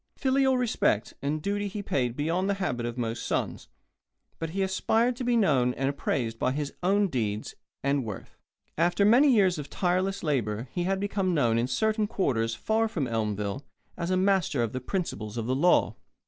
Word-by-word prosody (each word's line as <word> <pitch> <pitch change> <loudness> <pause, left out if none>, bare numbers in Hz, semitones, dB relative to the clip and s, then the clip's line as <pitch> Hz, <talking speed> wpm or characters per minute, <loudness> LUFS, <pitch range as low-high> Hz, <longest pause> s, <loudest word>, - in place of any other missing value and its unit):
Filial 265 -1 +2
respect 220 - +1
and 150 +2 -2
duty 205 0 -1
he 200 +1 -5
paid 125 -9 -1
beyond 170 +7 0
the 200 - +1
habit 125 -12 -2
of 120 +1 -5
most 115 -1 -3
sons, - - -2 0.7
but 165 - -3
he 195 +4 -1
aspired 225 +5 +1
to 250 - -5
be 240 -1 +2
known 130 - +3
and 135 +1 0
appraised 115 -5 -2
by 130 - +1
his 145 0 -3
own 200 +3 +3
deeds 110 - -2 0.3
and 140 0 +1
worth. 105 -4 -8 0.4
After 175 +4 +3
many 255 +7 +6
years 190 -8 +3
of 145 - -7
tireless 185 +2 0
labour 120 -6 -1
he 175 -1 -2
had 190 +1 0
become 195 -3 0
known 115 -6 +2
in 120 - 0
certain 215 - +1
quarters 115 - 0
far 220 - +1
from 175 -11 -2
Elmville 105 +1 -2 0.3
as 170 - -3
a 185 - +2
master 185 -9 +2
of 115 - -3
the 130 - -3
principles 120 - -4
of 115 - -2
the 125 - 0
law. 170 +7 +3
165 Hz, 190 wpm, -27 LUFS, 120-200 Hz, 0.7 s, many